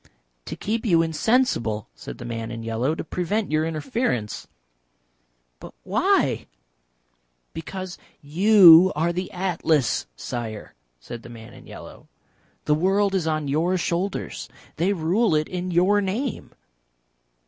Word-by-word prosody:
"To -, -, -6 dB
keep 225 Hz, +3 st, -3 dB
you 170 Hz, -8 st, +3 dB
insensible," 160 Hz, -, 0 dB
said -, -, -9 dB
the 120 Hz, -, -9 dB
man 115 Hz, -1 st, -5 dB
in 115 Hz, -1 st, -6 dB
yellow. 115 Hz, +7 st, -1 dB
"To -, -, -5 dB
prevent 185 Hz, +4 st, -2 dB
your 155 Hz, 0 st, +2 dB
interference." 160 Hz, -, -2 dB, 1.1 s
"But -, -, -12 dB
why?" -, -, +1 dB, 1.1 s
"Because 185 Hz, +3 st, -7 dB, 0.2 s
you 180 Hz, +2 st, +7 dB
are 165 Hz, +3 st, 0 dB
the 180 Hz, +2 st, -3 dB
Atlas, 170 Hz, -7 st, 0 dB
Sire," 110 Hz, -, -6 dB, 0.3 s
said 115 Hz, -, -9 dB
the 120 Hz, -, -12 dB
man 115 Hz, -1 st, -12 dB
in -, -, -15 dB
yellow. -, -, -12 dB, 0.6 s
"The 150 Hz, -, +3 dB
world 195 Hz, +5 st, +2 dB
is 180 Hz, -4 st, 0 dB
on 155 Hz, -2 st, -1 dB
your 165 Hz, +6 st, +1 dB
shoulders. 180 Hz, +3 st, -3 dB, 0.3 s
They 175 Hz, +5 st, +1 dB
rule 185 Hz, +2 st, +1 dB
it 155 Hz, 0 st, 0 dB
in 180 Hz, 0 st, -4 dB
your 185 Hz, +4 st, +3 dB
name." 215 Hz, +7 st, -3 dB
170 Hz, 130 wpm, -23 LUFS, 145-190 Hz, 1.1 s, you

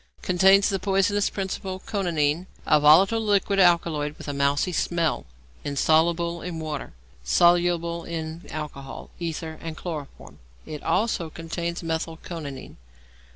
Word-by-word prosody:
Contains 190 Hz, +2 st, +5 dB
the 195 Hz, -2 st, -1 dB
poisonous 195 Hz, +1 st, +1 dB
principle 190 Hz, -1 st, -4 dB
coniine, 170 Hz, -4 st, -1 dB, 0.2 s
a 150 Hz, -, +4 dB
volatile 180 Hz, +10 st, +6 dB
liquid 200 Hz, -2 st, +1 dB
alkaloid 165 Hz, -5 st, +2 dB
with -, -, -10 dB
a 145 Hz, -, -2 dB
mousy 140 Hz, +5 st, +1 dB
smell; 165 Hz, -, -1 dB, 0.4 s
insoluble 165 Hz, +4 st, +1 dB
in 175 Hz, -2 st, -5 dB
water; 155 Hz, -3 st, -5 dB, 0.3 s
soluble 170 Hz, -, +3 dB
in 160 Hz, 0 st, -5 dB
alcohol, 140 Hz, -3 st, -7 dB
ether, 160 Hz, -1 st, -5 dB
and 160 Hz, -1 st, -6 dB
chloroform. 155 Hz, -6 st, -8 dB, 0.3 s
It 150 Hz, -1 st, -7 dB
also 180 Hz, -1 st, 0 dB
contains 170 Hz, +2 st, -5 dB
methyl 160 Hz, 0 st, -3 dB
coniine. 155 Hz, -6 st, -8 dB
170 Hz, 120 wpm, -25 LUFS, 155-180 Hz, 0.4 s, volatile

